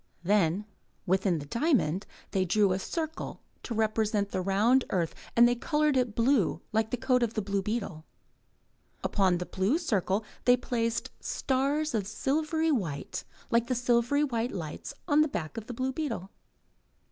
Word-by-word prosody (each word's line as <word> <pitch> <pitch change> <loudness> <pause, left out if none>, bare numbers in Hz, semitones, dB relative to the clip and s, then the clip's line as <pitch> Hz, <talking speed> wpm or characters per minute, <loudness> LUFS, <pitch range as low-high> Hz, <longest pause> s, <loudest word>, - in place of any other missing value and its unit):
Then, 195 0 +2 0.4
within 190 -1 +2
the 145 - -6
diamond, 210 - +1 0.2
they 190 - +2
drew 200 +2 +3
a 185 - 0
circle 320 - -4 0.2
to 235 - -5
represent 215 -2 +1
the 185 - -1
round 210 +8 +3
earth 170 -4 0 0.2
and 235 +1 +7
they 245 - +3
coloured 300 +3 +1
it 245 -4 +1
blue 230 - +2
like 220 0 +1
the 250 - -1
coat 255 0 +2
of 230 -2 0
the 215 - +1
blue 200 0 -1
beetle. 200 -6 -3 1.0
Upon 190 -3 +2
the 180 - -4
blue 195 - +1
circle 210 - 0 0.2
they 245 0 +6
placed 230 -2 -2
stars 285 +3 0
of 205 -4 -1
silvery 310 +8 0
white 170 - -2 0.3
like 235 0 +3
the 255 - 0
silvery 245 +4 +2
white 240 -4 -1
lights 160 -5 -6
on 300 -2 +5
the 305 - +4
back 160 - -4
of 225 -2 -6
the 245 - -5
blue 260 +2 -1
beetle. 235 - -3
225 Hz, 165 wpm, -29 LUFS, 195-260 Hz, 1.0 s, and